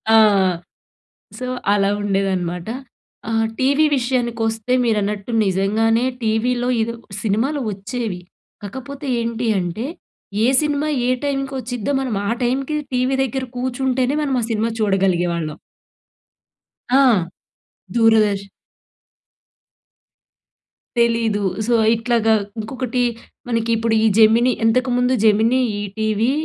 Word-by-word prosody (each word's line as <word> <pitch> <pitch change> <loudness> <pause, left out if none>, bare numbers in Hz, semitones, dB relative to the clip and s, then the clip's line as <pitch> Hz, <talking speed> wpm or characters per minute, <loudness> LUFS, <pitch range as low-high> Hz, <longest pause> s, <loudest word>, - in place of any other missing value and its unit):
ఆ! - - +8 1.2
సో, 255 - -5 0.3
అలా 200 -1 +2
ఉండేదనమాట. 190 -3 -1 0.6
ఆహ్, 225 0 +1
టీవీ 280 +4 +3
విషయానికొస్తే 235 -2 -1
మీరన్నట్టు 210 -1 -1
నిజంగానే 220 +5 +1 0.2
టీవీలో, 240 +3 0
ఇదొ 230 +1 -2 0.3
సినిమాలు 235 +8 0
వచ్చేవి 205 -1 -4 0.4
కకపోతే 270 +7 -7
ఏంటి 230 0 -2
అంటే? 180 +7 -3 0.6
ఏ - - +4
సినిమా 295 0 0 0.2
ఏ - - +2
టైంకొచ్చిద్దో 270 -3 -3
మనం 250 -6 -2
ఆ - - 0
టైంకి 270 +5 -1 0.2
టీవీ 255 +2 +1
దెగ్గర 265 +1 -3
కూర్చుంటేనే 260 +1 0
మనమా 265 -4 0
సినిమా 225 +1 0
చూడగలిగే 195 -4 +2
వాళ్ళం. 155 -3 -4 1.4
ఆ! - - +6 1.0
దూరదర్శన్. 215 -4 +3 2.5
తెలీదు. 230 -3 +1 0.2
సో, 240 - +2 0.2
ఇట్లాగా 225 -1 +1 0.3
ఇంకొకటి 250 +2 -3 0.5
మనకిప్పుడు 230 -1 0
ఈ - - +4
జెమినీ 225 +3 +5
ఇంతకుముందు 250 +2 +2
'జెమినీ', 225 +4 +4
'ఈ - - -3 0.2
టీవీ', 220 +3 +1
230 Hz, 100 wpm, -20 LUFS, 210-255 Hz, 2.5 s, ఆ